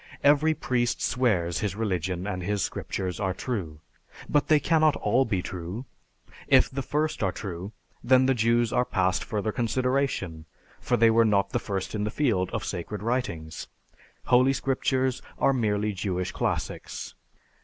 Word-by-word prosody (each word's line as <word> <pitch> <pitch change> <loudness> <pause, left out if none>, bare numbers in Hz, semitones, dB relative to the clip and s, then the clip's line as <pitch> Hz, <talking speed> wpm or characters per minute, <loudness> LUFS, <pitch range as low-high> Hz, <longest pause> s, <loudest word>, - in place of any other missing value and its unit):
Every 150 +2 +4
priest 120 -5 0
swears 95 -10 +1
his 100 -3 -2
religion 90 -4 -2
and 95 -3 -3
his 100 +2 -1
scriptures 95 -1 -3
are 95 -3 -1
true. 90 - -4 0.5
But 145 -1 +2
they 155 -1 +5
cannot 155 -1 +3
all 120 +6 +2
be 95 -6 -1
true. 90 +7 -6 0.6
If - - +5
the 135 +1 -3
first 150 +4 -1
are 95 -3 +1
true, 95 +1 -6 0.3
then 130 +2 +5
the 135 - +4
Jews 115 0 +2
are 125 - +3
past 95 -5 0
further 110 0 -2
consideration, 125 - -1 0.3
for - - 0
they 115 0 +5
were 115 +1 +5
not 100 -2 +2
the - - 0
first 95 -2 -4
in 105 -1 -1
the 105 - -1
field 105 -8 0
with 110 -2 -3
sacred 100 0 -5
writings.... 105 -11 -3 0.6
Holy 130 +2 +4
scriptures 130 -1 0 0.2
are 135 - +3
merely 105 -4 0
Jewish 90 -2 -2
classics. - - -3
110 Hz, 155 wpm, -27 LUFS, 95-130 Hz, 0.6 s, they